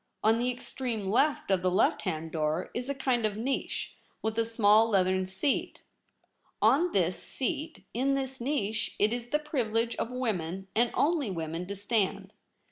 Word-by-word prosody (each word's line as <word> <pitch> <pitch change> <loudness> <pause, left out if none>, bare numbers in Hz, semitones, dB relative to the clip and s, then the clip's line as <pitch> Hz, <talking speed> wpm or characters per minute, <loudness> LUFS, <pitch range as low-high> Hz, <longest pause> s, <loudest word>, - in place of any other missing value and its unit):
On 225 +1 +4
the 245 +1 +1
ex 250 - -8
treme 225 -7 -2
left 275 -2 +2
of 190 -2 +3
the 185 - +2
left 185 +4 +2
hand 165 -4 -3
door 155 +2 -1
Is 250 +2 -3
a 280 - -1
kind 255 -3 +1
of 210 -1 0
niche, 260 +5 -2 0.3
with 220 0 -1
a 230 - +2
small 225 0 +4
leathern 185 -2 +2
seat. 190 +9 -1 0.8
On 340 +6 +4
this 180 -2 +1
seat. 310 +3 -3
In 270 +4 +1
this 265 -2 -3
niche. 220 -5 -1
It 210 +2 +3
Is 240 0 -4
the 300 - +3
privilege 235 -6 -1
of - - -2
women, 195 -8 -2
and 235 +2 +3
only 300 -6 +2
women, 165 0 -4
to 200 - -4
stand. 200 -1 -1
225 Hz, 175 wpm, -29 LUFS, 190-260 Hz, 0.8 s, On